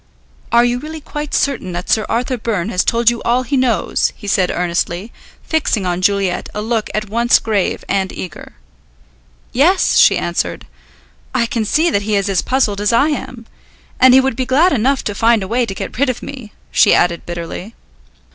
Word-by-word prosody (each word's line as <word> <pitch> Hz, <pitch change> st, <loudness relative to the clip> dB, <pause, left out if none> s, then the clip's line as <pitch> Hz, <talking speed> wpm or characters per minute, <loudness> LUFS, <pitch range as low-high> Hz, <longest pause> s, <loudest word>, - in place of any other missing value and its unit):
"Are 235 Hz, +1 st, +5 dB
you 245 Hz, 0 st, 0 dB
really 310 Hz, +3 st, -7 dB
quite 295 Hz, 0 st, -6 dB
certain 245 Hz, -10 st, -1 dB
that 175 Hz, +1 st, -5 dB
Sir 215 Hz, -1 st, +1 dB
Arthur 250 Hz, +2 st, -1 dB
Byrne 215 Hz, -4 st, -2 dB
has 185 Hz, -4 st, +1 dB
told 235 Hz, 0 st, +3 dB
you 235 Hz, -, -5 dB
all 245 Hz, +2 st, +1 dB
he 280 Hz, +3 st, -2 dB
knows?" 245 Hz, -8 st, +1 dB
he 210 Hz, -, -13 dB
said 190 Hz, -2 st, +1 dB
earnestly, 175 Hz, +4 st, -2 dB, 0.3 s
fixing 290 Hz, -, 0 dB
on 180 Hz, 0 st, -1 dB
Juliet 195 Hz, -1 st, 0 dB
a 210 Hz, -, -2 dB
look 225 Hz, -1 st, -1 dB
at 215 Hz, 0 st, -2 dB
once 235 Hz, +2 st, +4 dB
grave 210 Hz, -4 st, -1 dB
and 195 Hz, -1 st, -1 dB
eager. 180 Hz, -4 st, -8 dB, 1.0 s
"Yes," 350 Hz, +9 st, +3 dB
she -, -, +6 dB
answered. -, -, -3 dB, 0.7 s
"I 235 Hz, -, +2 dB
can 230 Hz, -1 st, -2 dB
see 315 Hz, +10 st, +2 dB
that 200 Hz, -, +1 dB
he 210 Hz, +1 st, -1 dB
is 200 Hz, 0 st, 0 dB
as 190 Hz, -3 st, +1 dB
puzzled 220 Hz, -6 st, 0 dB
as 210 Hz, -, +1 dB
I 275 Hz, +6 st, +3 dB
am. 255 Hz, -5 st, -5 dB, 0.5 s
And 255 Hz, 0 st, +7 dB
he 265 Hz, -, +7 dB
would 265 Hz, -3 st, -1 dB
be 260 Hz, -, -1 dB
glad 295 Hz, +8 st, +3 dB
enough 265 Hz, +2 st, +1 dB
to 205 Hz, -, -3 dB
find 225 Hz, 0 st, +2 dB
a -, -, -5 dB
way 240 Hz, +3 st, 0 dB
to 195 Hz, -, -5 dB
get -, -, -6 dB
rid 280 Hz, -1 st, +2 dB
of 250 Hz, -, -4 dB
me," 255 Hz, -6 st, -9 dB, 0.2 s
she -, -, +5 dB
added 170 Hz, -1 st, 0 dB
bitterly. 175 Hz, +5 st, -6 dB
230 Hz, 195 wpm, -17 LUFS, 200-255 Hz, 1.0 s, And